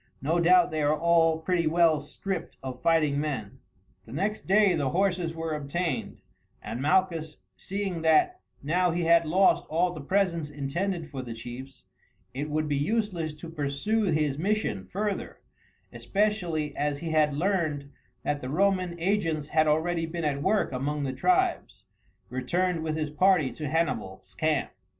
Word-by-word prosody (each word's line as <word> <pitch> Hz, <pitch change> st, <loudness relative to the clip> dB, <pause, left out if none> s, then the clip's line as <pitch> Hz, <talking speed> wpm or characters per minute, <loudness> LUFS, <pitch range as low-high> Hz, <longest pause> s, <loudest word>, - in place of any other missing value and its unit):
No 160 Hz, +5 st, 0 dB
doubt 175 Hz, +1 st, +5 dB
they 155 Hz, -1 st, -1 dB
are 150 Hz, +1 st, +2 dB
all 165 Hz, 0 st, +3 dB
pretty 170 Hz, 0 st, 0 dB
well 165 Hz, -2 st, +3 dB
stripped 190 Hz, -4 st, -5 dB
of 130 Hz, -1 st, -6 dB
fighting 155 Hz, -3 st, +2 dB
men." 135 Hz, -10 st, -4 dB, 0.5 s
The -, -, -12 dB
next 200 Hz, -, -2 dB
day 200 Hz, 0 st, +5 dB
the 145 Hz, -5 st, 0 dB
horses 180 Hz, -1 st, 0 dB
were 165 Hz, -1 st, -3 dB
obtained, 150 Hz, +1 st, -3 dB, 0.4 s
and 120 Hz, -, -6 dB
Malchus, 165 Hz, -1 st, +1 dB, 0.2 s
seeing 195 Hz, -3 st, -4 dB
that, 360 Hz, -, +3 dB, 0.2 s
now 175 Hz, +5 st, +2 dB
he 170 Hz, +1 st, -1 dB
had 170 Hz, 0 st, +4 dB
lost 185 Hz, +5 st, +3 dB
all 175 Hz, +3 st, +1 dB
the 155 Hz, -, -7 dB
presents 170 Hz, -1 st, 0 dB
intended 160 Hz, +5 st, -3 dB
for 135 Hz, -3 st, -4 dB
the 120 Hz, -3 st, -7 dB
chiefs, 125 Hz, +3 st, -9 dB, 0.5 s
it 145 Hz, +4 st, -4 dB
would 155 Hz, +1 st, -1 dB
be 145 Hz, -1 st, 0 dB
useless 170 Hz, -2 st, -1 dB
to 160 Hz, +2 st, -9 dB
pursue 155 Hz, +9 st, -1 dB
his 155 Hz, -5 st, 0 dB
mission 185 Hz, -, -1 dB
further, 205 Hz, 0 st, -3 dB, 0.6 s
especially 180 Hz, -8 st, -1 dB
as 145 Hz, 0 st, -1 dB
he 165 Hz, +1 st, -5 dB
had 150 Hz, -2 st, +3 dB
learned 155 Hz, -5 st, -1 dB, 0.3 s
that 145 Hz, -1 st, -1 dB
the 130 Hz, -, -5 dB
Roman 185 Hz, +1 st, +1 dB
agents 165 Hz, -5 st, 0 dB
had 155 Hz, 0 st, +3 dB
already 165 Hz, +2 st, +1 dB
been 170 Hz, 0 st, -4 dB
at 140 Hz, -1 st, -1 dB
work 200 Hz, +5 st, +1 dB
among 145 Hz, +3 st, -2 dB
the 135 Hz, -1 st, -2 dB
tribes, 365 Hz, -, 0 dB, 0.4 s
returned 170 Hz, +7 st, -1 dB
with 155 Hz, -1 st, -2 dB
his 155 Hz, -2 st, -2 dB
party 165 Hz, -3 st, +3 dB
to 150 Hz, -3 st, -5 dB
Hannibal's 95 Hz, -, -2 dB
camp. 155 Hz, +6 st, 0 dB
160 Hz, 160 wpm, -27 LUFS, 145-180 Hz, 0.6 s, doubt